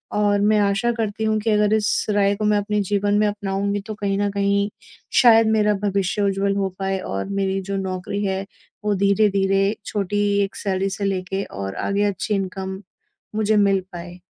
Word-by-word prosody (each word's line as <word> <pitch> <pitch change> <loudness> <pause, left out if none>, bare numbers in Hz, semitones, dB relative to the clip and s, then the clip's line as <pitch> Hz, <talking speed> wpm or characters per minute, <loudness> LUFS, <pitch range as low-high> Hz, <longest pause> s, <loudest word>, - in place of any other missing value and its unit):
और 205 -1 +2
मैं 210 +1 +3
आशा 205 +4 +1
करती 220 0 -2
हूँ 220 0 +1
कि 225 - -1
अगर 210 0 +3
इस 210 -1 +1
राय 205 -1 +2
को 215 +1 -3
मैं 210 0 +3
अपने 210 +1 -1
जीवन 205 0 +1
में 215 - +3
अपनाऊँगी 200 0 -2
तो 215 - -4
कहीं 200 -2 -1
न 205 0 +1
कहीं 200 0 +1 0.5
शायद 225 -2 +6
मेरा 210 -1 +3
भविष्य 200 0 0
उज्ज्वल 200 0 +1
हो 195 -1 0
पाए 195 0 -1
और 95 - -4
मेरी 195 0 0
जो 195 +1 -4
नौकरी 190 +1 -3
है 195 0 -2 0.4
वो 210 - +2
धीरे-धीरे 195 0 +2
छोटी 205 0 -1 0.2
एक 195 - -5
सैलरी 195 0 -1
से 200 +1 -3
लेके 195 0 -2
और 95 0 -6
आगे 200 +1 +1
अच्छी 205 +1 -1
इनकम 190 0 -4 0.5
मुझे 215 0 +2
मिल 195 -2 +3
पाए। 175 +1 -8
200 Hz, 185 wpm, -22 LUFS, 195-210 Hz, 0.5 s, शायद